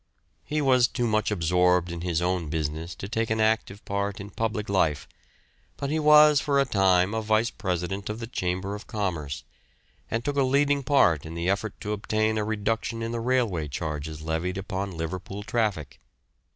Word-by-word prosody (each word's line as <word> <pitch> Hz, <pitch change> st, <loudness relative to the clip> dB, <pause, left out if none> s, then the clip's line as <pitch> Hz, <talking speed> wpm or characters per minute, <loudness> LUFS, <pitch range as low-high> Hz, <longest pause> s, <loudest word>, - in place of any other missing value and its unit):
He 150 Hz, 0 st, -1 dB
was 130 Hz, -3 st, +5 dB
too 120 Hz, -1 st, -2 dB
much 110 Hz, -2 st, +1 dB
absorbed 90 Hz, -1 st, +2 dB
in 85 Hz, -1 st, -5 dB
his 85 Hz, -1 st, -1 dB
own 90 Hz, -3 st, -1 dB
business 80 Hz, +2 st, -3 dB
to 95 Hz, -, -7 dB
take 115 Hz, +1 st, -1 dB
an 110 Hz, 0 st, 0 dB
active 110 Hz, -2 st, 0 dB
part 100 Hz, 0 st, -2 dB
in 100 Hz, +1 st, -8 dB
public 110 Hz, 0 st, -2 dB
life, 80 Hz, -7 st, +1 dB, 0.7 s
but 140 Hz, 0 st, -3 dB
he 160 Hz, -, +1 dB
was 150 Hz, -1 st, +7 dB
for 140 Hz, -1 st, +2 dB
a 140 Hz, -, +3 dB
time 95 Hz, -4 st, +3 dB
a 110 Hz, -, -1 dB
vice 110 Hz, +2 st, +1 dB
president 95 Hz, +1 st, -3 dB
of 105 Hz, +1 st, -4 dB
the 115 Hz, -, -4 dB
Chamber 95 Hz, -3 st, -2 dB
of 105 Hz, -, -8 dB
Commerce, 85 Hz, -, -3 dB, 0.7 s
and 115 Hz, +1 st, -2 dB
took 145 Hz, -1 st, -1 dB
a -, -, +4 dB
leading 140 Hz, +2 st, +2 dB
part 125 Hz, -, +3 dB
in 80 Hz, +1 st, -8 dB
the 85 Hz, +1 st, -2 dB
effort 100 Hz, +2 st, -1 dB
to 105 Hz, -1 st, -2 dB
obtain 110 Hz, +1 st, 0 dB
a -, -, 0 dB
reduction 110 Hz, +2 st, -2 dB
in 115 Hz, -, -3 dB
the 120 Hz, -, -2 dB
railway 115 Hz, -10 st, 0 dB
charges 75 Hz, +2 st, -5 dB
levied 80 Hz, +4 st, -2 dB
upon 95 Hz, -2 st, -4 dB
Liverpool 95 Hz, +5 st, -5 dB
traffic. 100 Hz, -, -2 dB
100 Hz, 185 wpm, -26 LUFS, 90-115 Hz, 0.7 s, was